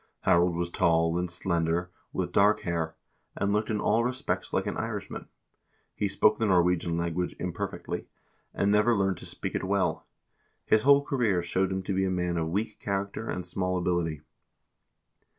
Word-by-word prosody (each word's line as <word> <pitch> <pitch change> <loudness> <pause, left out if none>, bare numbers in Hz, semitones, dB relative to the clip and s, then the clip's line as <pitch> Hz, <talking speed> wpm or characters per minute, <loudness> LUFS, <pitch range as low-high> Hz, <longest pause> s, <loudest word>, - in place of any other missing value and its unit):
Harald 85 -1 +3
was 85 0 -2
tall 85 -1 +2
and 90 0 -2
slender, 85 0 -1 0.2
with - - -2
dark 105 +2 +4
hair, 85 -2 -2 0.4
and 100 0 0
looked 105 +1 0
in 105 -2 0
all 115 +2 +2
respects 125 +2 -2
like - - 0
an - - -2
Irishman; - - -5 0.7
he 105 - -1
spoke 105 +2 +3
the 110 - +2
Nor 90 -3 +5
wegian 85 -1 0
language 85 +1 -2
imperfectly, 90 -2 -4 0.4
and 100 - +1
never 105 +3 +4
learned 95 -2 +1
to - - -8
speak - - -5
it - - -2
well; - - 0 0.6
his 110 - +4
whole 140 +3 +6
career 115 -11 +1
showed 95 +2 0
him 95 0 -2
to 95 - -2
be 95 +1 +1
a - - 0
man 90 -1 -1
of 80 -1 -1
weak 105 +4 -2
character 100 +2 -3
and 90 - -3
small 90 0 -1
ability. 85 -4 -1
90 Hz, 175 wpm, -28 LUFS, 85-105 Hz, 0.7 s, whole